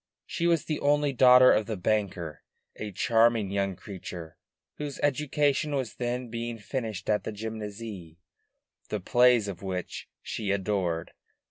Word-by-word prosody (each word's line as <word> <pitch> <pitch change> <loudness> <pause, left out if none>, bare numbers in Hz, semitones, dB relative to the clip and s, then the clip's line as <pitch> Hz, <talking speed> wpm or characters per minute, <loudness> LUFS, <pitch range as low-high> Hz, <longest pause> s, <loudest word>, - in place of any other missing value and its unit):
She 170 -2 -1
was 170 -3 +2
the 155 - -2
only 145 0 +2
daughter 125 0 +8
of 110 - +2
the 110 -2 -3
banker, 90 -5 -1 0.3
a 105 -1 -5
charming 115 -1 +3
young 100 -1 0
creature 85 -4 -9 0.4
whose 145 -2 -5
education 145 0 +1
was 130 -5 -2
then 125 0 -2
being 115 0 -4
finished 110 -2 -4
at 105 -1 +1
the - - -4
Gymnase, 105 -5 -7 0.7
the 105 - -2
plays 120 +2 +4
of 95 -4 -6
which 95 -2 -5
she 105 -3 -4
adored. 95 -4 -1
110 Hz, 140 wpm, -28 LUFS, 100-125 Hz, 0.7 s, daughter